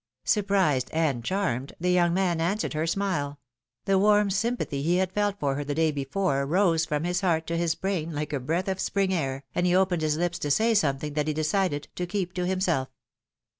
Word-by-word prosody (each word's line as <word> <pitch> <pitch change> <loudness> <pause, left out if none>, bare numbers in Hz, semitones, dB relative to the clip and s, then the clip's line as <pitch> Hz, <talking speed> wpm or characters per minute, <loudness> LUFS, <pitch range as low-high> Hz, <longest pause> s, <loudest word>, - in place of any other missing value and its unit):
'^ - - -23
Surprised 195 - +2
and 150 -7 0
charmed, 140 - -1
the 180 +1 +1
young 175 -1 +3
man 175 -2 +1
answered 195 +5 -1
her 155 +2 -1
smile; 165 -6 -1 0.5
the 195 -1 +3
warm 205 0 +4
sympathy 210 - -1
he 170 +5 +1
had 185 0 +1
felt 205 0 -1
for 140 -2 0
her 145 +2 -3
the 145 0 -3
day 160 0 +2
before 140 +1 -1
rose 165 +1 +2
from 150 -1 -2
his 180 +1 -1
heart 165 -4 +1
to 170 - -3
his 165 -1 0
brain 180 -4 -2
like 150 0 -4
a 140 - 0
breath 165 +9 -2
of 190 -1 -2
spring 195 -1 0
air, 135 -5 -2
and 180 0 +1
he 180 - +3
opened 185 -3 +2
his 155 -1 +1
lips 175 +1 -1
to 145 - -2
say 225 +10 +3
something 150 -6 0
that 150 0 -1
he 155 - -1
decided 155 -1 0
to 180 - -4
keep 185 -1 -2
to 180 -1 -2
himself. 180 -8 0
170 Hz, 215 wpm, -26 LUFS, 150-190 Hz, 0.5 s, warm